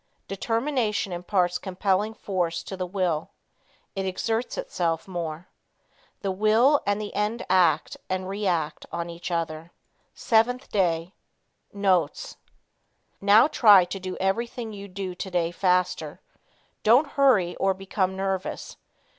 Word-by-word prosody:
Determination 225 0 -1
imparts 180 0 0
compelling 195 +3 -1
force 175 -5 -2
to 190 - -6
the 185 -1 -4
will. 175 -4 -1 0.7
It 195 - -2
exerts 225 +5 -2
itself 175 - -2
more. 170 -2 -5 0.7
The 195 - -1
will 220 +9 +4
and 205 0 +1
the 210 -1 -6
end 215 +3 -1
act 170 -5 +3
and 185 0 -2
react 190 -6 -2
on 170 0 -4
each 170 +1 -7
other. 165 -1 -3 0.5
7th 245 +3 +1
Day. 175 -2 0 0.6
Notes. 190 -6 0 0.8
Now 205 +3 +6
try 205 - +6
to 195 - -6
do 185 0 -6
everything 230 +4 -2
you 200 -1 -8
do 190 -1 -5
today 180 -2 -2
faster. 180 0 0 0.6
Don't 250 +7 +4
hurry 230 -11 +3
or 195 0 +1
become 190 0 -2
nervous. 190 -1 -3
190 Hz, 120 wpm, -25 LUFS, 180-215 Hz, 0.8 s, Now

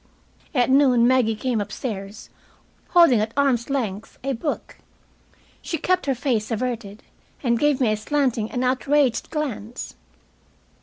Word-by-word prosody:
At 250 -1 +3
noon 255 -4 +5
Maggie 245 -4 +3
came 230 0 -1
upstairs, 205 -1 -6 0.6
holding 335 -10 +6
at 215 +1 -2
arm's 265 -4 +2
length 220 -7 -3
a 275 0 -1
book. 285 +5 -4 0.8
She 330 - -3
kept 365 +1 0
her 270 - +1
face 230 -4 -1
averted, 225 -3 -4 0.4
and 235 -2 +2
gave 295 -2 +2
me 240 -5 +2
a 215 - 0
slanting 240 -2 0
and 250 - -2
outraged 260 -1 +1
glance. 250 -7 -4
250 Hz, 135 wpm, -23 LUFS, 220-275 Hz, 0.8 s, holding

